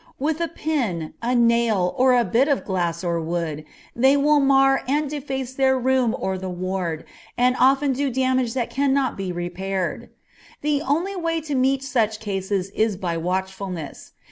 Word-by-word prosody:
With 310 +4 -1
a 335 - +1
pin, 245 - -2
a 245 +2 0
nail, 235 -6 +2
or 255 0 +4
a 240 - +3
bit 235 +9 +2
of 285 -3 0
glass 175 -3 -2
or 170 -1 -1
wood, 160 -2 -3 0.3
they 265 +4 +4
will 295 +1 +4
mar 270 -1 +4
and 295 +3 +1
deface 270 -3 -4
their 265 0 +2
room 255 -2 +1
or 190 -1 -2
the 190 0 -5
ward, 180 -3 -3 0.3
and 250 +1 +3
often 270 +1 +4
do 280 +2 -1
damage 255 -1 0
that 245 -3 -2
cannot 275 -1 +1
be 195 -2 -4
repaired. 180 +1 -3 0.5
The 295 -1 +1
only 330 +8 -1
way 330 -2 -1
to 300 -1 -5
meet 265 +1 +1
such 225 -5 0
cases 195 -2 -2
is 215 -1 0
by 175 -3 -2
watchfulness. 185 -1 -4
240 Hz, 170 wpm, -23 LUFS, 190-270 Hz, 0.5 s, or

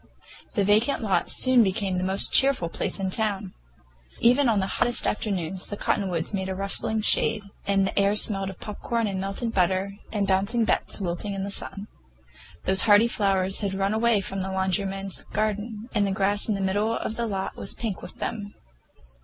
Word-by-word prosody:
That 200 -4 +2
vacant 220 +6 +2
lot 190 -5 0
soon 255 -1 +4
became 195 -2 0
the - - -2
most 190 +1 +1
cheerful 270 -11 +4
place - - -3
in 190 -1 -2
town. 200 -3 -2 0.7
Even 250 +3 +4
on 215 -3 +2
the 190 - +1
hottest 240 +5 +2
afternoons 190 -4 -2
the 205 - -6
cottonwoods 180 -4 -1
made 190 -1 -2
a 190 - -3
rustling 200 +3 0
shade, 220 0 +3 0.2
and 195 -1 +2
the 195 - -1
air 200 +1 +3
smelled 195 -2 0
of 190 - -10
popcorn 230 +2 -3
and 195 -2 -2
melted 195 +4 -3
butter, 190 +2 0
and 205 -2 0
Bouncing 200 +5 +1
Bets - - -1
wilting 195 +2 -3
in 195 - -3
the 200 - -4
sun. 200 +1 -3 0.8
Those 190 0 +6
hardy 210 +3 +7
flowers 195 -4 +2
had 200 -2 -2
run 195 +1 0
away 225 -1 +2
from 195 0 -4
the 190 +1 -3
laundryman's 195 0 -2
garden, 215 +1 -3
and 205 -3 +2
the - - -1
grass 200 +1 +1
in 210 - +1
the 195 - -3
middle 205 +4 0
of 220 - -4
the 235 0 -2
lot 195 -2 -3
was 195 - -4
pink 220 -5 -4
with - - -9
them. 205 -3 -5
200 Hz, 190 wpm, -25 LUFS, 190-215 Hz, 0.8 s, hardy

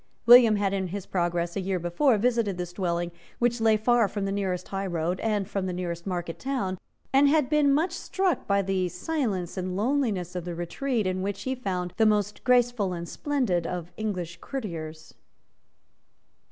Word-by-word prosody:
William 240 -2 +8
had, 200 -1 0
in 190 -1 -1
his 195 +1 -5
progress 175 -1 -1
a 195 - -1
year 190 0 -1
before, 180 - +2
visited 230 -4 +1
this 175 -1 -5
dwelling, 175 -2 -1 0.3
which 240 -1 +1
lay 220 -1 +4
far 235 0 +3
from 195 +1 -3
the 195 - -1
nearest 190 -3 -2
high 195 0 -2
road 175 +1 -1
and 210 -3 0
from 195 -2 -2
the 180 - -2
nearest 175 0 -4
market 175 -3 -3
town, 200 -9 -2 0.3
and 280 +1 +6
had 300 -2 +2
been 300 -2 +4
much 315 +5 +2
struck 375 +1 -1
by 200 0 +2
the 185 -1 0
silence 195 - -2
and 185 0 -3
loneliness 210 -7 0
of 180 - -3
the 175 0 -5
retreat 220 +7 -2
in 185 0 -1
which 200 +1 -3
he 260 - -1
found 185 -8 -3
the 225 - +4
most 210 -1 0
graceful 245 -6 +2
and 170 -1 -5
splendid 230 - -1
of 175 -1 -5
English 180 -6 -4
courtiers. 160 - -6
195 Hz, 180 wpm, -27 LUFS, 180-240 Hz, 0.3 s, William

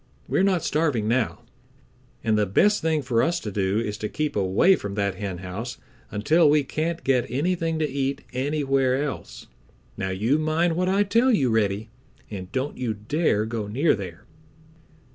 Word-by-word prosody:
"We - - +1
are - - +4
not 190 -4 +2
starving 145 -9 0
now, 120 0 0 0.8
and 110 -2 +2
the 105 -1 +2
best 205 - +3
thing 160 -2 +1
for 120 -3 +1
us 170 +1 +1
to 105 - -5
do 95 0 0
is 105 -2 -2
to 105 - -3
keep 155 -1 -2
away 100 - +4
from 100 - -6
that 100 -1 0
henhouse 95 +4 -5 0.3
until 155 +10 +3
we 150 0 +4
can't 160 +4 -3
get 130 -3 +2
anything 165 +3 0
to 155 -1 0
eat 135 0 -2
anywhere 135 -1 +1
else, 145 - -6 0.5
Now 95 - -2
you 110 +10 +1
mind 160 +2 +1
what 180 +2 +1
I 200 +2 +3
tell 230 +6 +3
you, 135 - +2
Reddy, 110 0 0 0.4
and 95 -2 -7
don't 130 +2 -3
you 120 -4 -1
dare 110 0 0
go 110 -2 -4
near 135 +10 +2
there." 95 -5 -7
130 Hz, 175 wpm, -24 LUFS, 105-155 Hz, 0.8 s, are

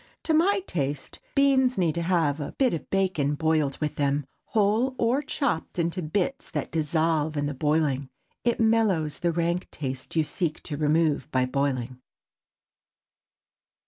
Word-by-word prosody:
To 320 - +1
my 380 +5 +3
taste, 145 - -3 0.2
beans 265 -2 +4
need 170 -4 +2
to 170 - -2
have 165 -4 +1
a 145 - -5
bit 260 -3 +2
of 165 - -5
bacon 180 -7 +1
boiled 155 -2 +1
with 150 -1 -3
them—whole, 200 - 0
or 240 +5 +2
chopped 275 - -2
into 170 +2 0
bits 200 - -2
that - - -3
dissolve 155 -1 +1
in 145 - 0
the 145 - -2
boiling. 145 -2 0 0.3
It 240 -1 +1
mellows 220 -9 +2
the 175 -1 +1
rank 170 +1 -1
taste 130 -1 -5
you 160 - +4
seek 155 0 -3
to 150 - -4
remove 150 -1 +1
by 130 -3 +2
boiling. 130 -2 -1
160 Hz, 145 wpm, -26 LUFS, 145-200 Hz, 0.3 s, beans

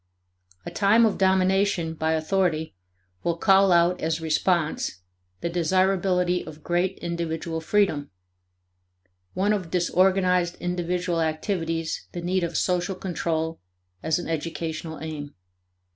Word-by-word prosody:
A - - -5
time 220 +3 +4
of 215 - 0
domination 190 -2 +2
by 160 0 0
authority 160 - 0 0.5
will 170 -1 0
call 195 +1 +5
out 175 +1 +3
as 160 0 0
response 160 - 0 0.4
the - - -1
desirability 180 +1 +1
of 150 0 -11
great 180 +2 0
individual 165 -1 -3
freedom; 160 -6 +1 1.3
one 200 +3 +2
of 185 -5 -3
disorganized 180 0 +2
individual 175 -1 -1
activities 165 0 -2
the 175 - -4
need 185 +1 0
of 170 -1 -2
social 180 +1 0
control 165 -3 -2 0.4
as 160 -1 +1
an 175 - -5
educational 160 0 -4
aim. 150 -2 -6
175 Hz, 115 wpm, -25 LUFS, 160-185 Hz, 1.3 s, call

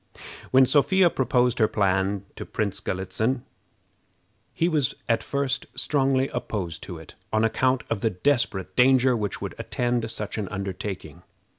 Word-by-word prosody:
When 130 0 +6
Sophia 175 +6 +4
proposed 125 -1 +1
her 110 - +5
plan 95 -1 0
to - - -6
Prince 105 -3 -2
Galitzin, 105 +7 -2 1.1
he 165 - +1
was 150 -7 +1
at 115 - +2
first 140 -2 -2
strongly 135 -2 +1
opposed 90 -6 -4
to 85 - -7
it, 80 -1 -12 0.2
on 110 0 +2
account 130 +3 +2
of 115 -4 -2
the 115 - +2
desperate 105 -2 0
danger 130 0 +5
which 105 -4 -3
would - - -4
attend 120 -2 -1
such 110 -1 -2
an 100 - -3
undertaking. 95 0 -5
115 Hz, 145 wpm, -25 LUFS, 100-130 Hz, 1.1 s, When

